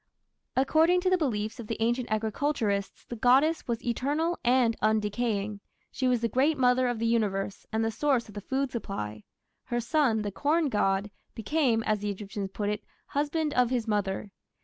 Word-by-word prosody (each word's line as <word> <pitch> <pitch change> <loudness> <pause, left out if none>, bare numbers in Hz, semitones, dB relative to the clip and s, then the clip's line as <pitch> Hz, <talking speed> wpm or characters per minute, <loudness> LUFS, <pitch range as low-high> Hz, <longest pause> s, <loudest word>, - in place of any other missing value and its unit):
According 320 +7 +4
to 370 0 +1
the 370 - +5
beliefs 225 -5 -2
of 230 - -7
the 225 - -3
ancient 240 +2 0
agriculturists 215 -2 -1
the 240 - -6
goddess 265 +8 +3
was 235 -1 -3
eternal 290 +8 0
and 245 -2 +3
undecaying. 215 -1 0 0.3
She 260 - -1
was 250 -2 +2
the 230 - +2
Great 275 +7 +2
Mother 250 0 +3
of 245 -1 -1
the 230 - -1
Universe 200 -4 -1
and 220 0 0
the 225 - 0
source 255 +1 +1
of 210 - -12
the 205 - -6
food 265 +4 -1
supply. 105 - -5 0.4
Her 240 - -1
son, 240 -3 +1
the 205 - -3
corn 300 - +1
god, 200 -2 +1 0.2
became, 230 -1 +1
as 215 -1 +1
the 205 +1 -3
Egyptians 200 0 -5
put 205 0 -2
it, 210 0 -3 0.3
"Husband 295 +1 -1
of 250 -1 +3
his 245 -3 -1
Mother". 205 -1 -1
235 Hz, 180 wpm, -28 LUFS, 210-270 Hz, 0.4 s, the